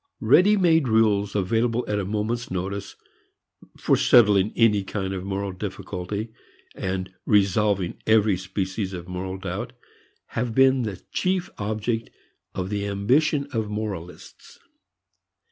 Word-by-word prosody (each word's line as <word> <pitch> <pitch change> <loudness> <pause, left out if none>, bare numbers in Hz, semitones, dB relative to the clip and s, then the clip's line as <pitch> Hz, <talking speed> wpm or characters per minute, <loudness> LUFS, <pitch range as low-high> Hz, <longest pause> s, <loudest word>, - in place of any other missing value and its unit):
Ready 205 +4 +5
made 165 -6 +3
rules 105 -3 +2
available 115 +4 +1
at 105 -1 0
a 100 - -2
moment's 110 +4 -2
notice 95 +2 -4 0.8
for - - +2
settling 105 -4 +5
any 105 -4 +3
kind 95 -1 -3
of 95 -1 -4
moral 100 0 -3
difficulty 100 +2 -5 0.4
and 95 0 -4
resolving 100 -2 +2
every 110 -2 +4
species 95 +1 -3
of 90 -1 -7
moral 95 +1 -5
doubt 95 - -5 0.6
have 115 -1 -3
been 130 0 +5
the 105 -6 -4
chief 185 -1 -1
object 110 +2 -2 0.5
of 95 +1 -3
the 100 0 -2
ambition 135 +9 +1
of 110 -3 -1
moralists. 100 -5 -7
105 Hz, 125 wpm, -24 LUFS, 95-115 Hz, 0.8 s, Ready